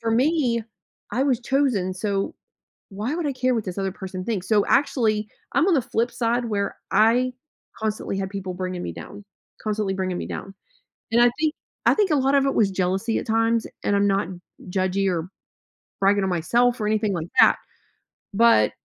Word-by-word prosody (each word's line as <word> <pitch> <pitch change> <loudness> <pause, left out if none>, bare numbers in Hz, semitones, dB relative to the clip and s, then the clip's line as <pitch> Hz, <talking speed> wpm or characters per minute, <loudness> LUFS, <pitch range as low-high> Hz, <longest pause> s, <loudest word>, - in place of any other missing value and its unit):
for 225 -1 -1
me, 250 -2 +2 0.5
I 260 - +2
was 260 -5 +1
chosen, 245 -8 +1
so, 195 0 -2 0.6
why 215 +9 -3
would 340 -2 -2
I 285 - 0
care 255 0 +1
what 225 -3 -1
this 185 -2 -5
other 195 -1 -1
person 185 -1 -6
thinks? 205 -6 -3
So, 210 -2 +4
actually, 220 -6 +2 0.2
I'm 335 - +3
on 360 - +4
the 270 - +2
flip 240 0 -1
side 240 0 0
where 200 -2 -2
I 245 +4 +3 0.5
constantly 215 -2 -2
had 190 -1 -3
people 190 -2 -5
bringing 185 -1 -4
me - - -4
down, 205 +1 -10 0.4
constantly 210 -2 -1
bringing 185 -1 -2
me - - -4
down, 195 - -7 0.6
and 235 - +4
I 240 - +6
think 310 -1 +1 0.3
I - - +7
think 410 -5 +2
a - - +4
lot 270 +1 +2
of 275 -1 +4
it 275 - +1
was 205 -3 +3
jealousy 190 +4 0
at - - -5
times, 225 +1 +1 0.2
and 205 - +2
I'm 200 0 +3
not 195 -3 +1 0.4
judgy 190 +1 0
or 170 0 -2 0.7
bragging 200 +1 +3
on 190 - 0
myself 235 +9 +2
or - - 0
anything 215 -1 +1
like 165 -1 -3
that, - - +7 0.8
but 220 - +5
215 Hz, 190 wpm, -24 LUFS, 195-245 Hz, 0.8 s, I